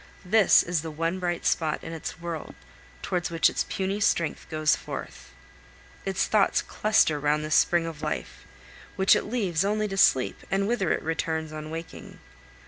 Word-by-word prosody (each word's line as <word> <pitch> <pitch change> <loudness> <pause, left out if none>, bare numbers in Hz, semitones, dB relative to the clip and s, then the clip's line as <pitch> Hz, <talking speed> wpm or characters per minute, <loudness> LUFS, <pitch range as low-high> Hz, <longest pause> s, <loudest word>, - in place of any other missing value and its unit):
This 215 +1 +5
is 170 -2 -1
the 165 - -6
one 165 +4 -2
bright 175 -1 -2
spot 155 -2 0
in 165 - -6
its 165 +1 -6
world, 170 -2 -6 0.5
towards 180 -1 -1
which 165 -1 +3
its - - -2
puny 195 +1 -2
strength 170 -5 0
goes 155 -1 +2
forth. - - -8 0.8
Its 195 -1 0
thoughts 210 -2 +2
cluster 200 -8 +2
round 150 +1 0
this 155 - -2
spring 170 +1 +3
of 160 -2 -7
life, 65 - -5 0.5
which 190 0 +5
it - - -1
leaves 195 -7 0
only 210 +1 0
to 195 -1 -5
sleep, 130 -9 +3
and 195 +1 0
whither 225 -7 0
it - - -1
returns 160 -1 -2
on 155 0 -7
waking. 165 +1 -8
165 Hz, 170 wpm, -26 LUFS, 155-195 Hz, 0.8 s, This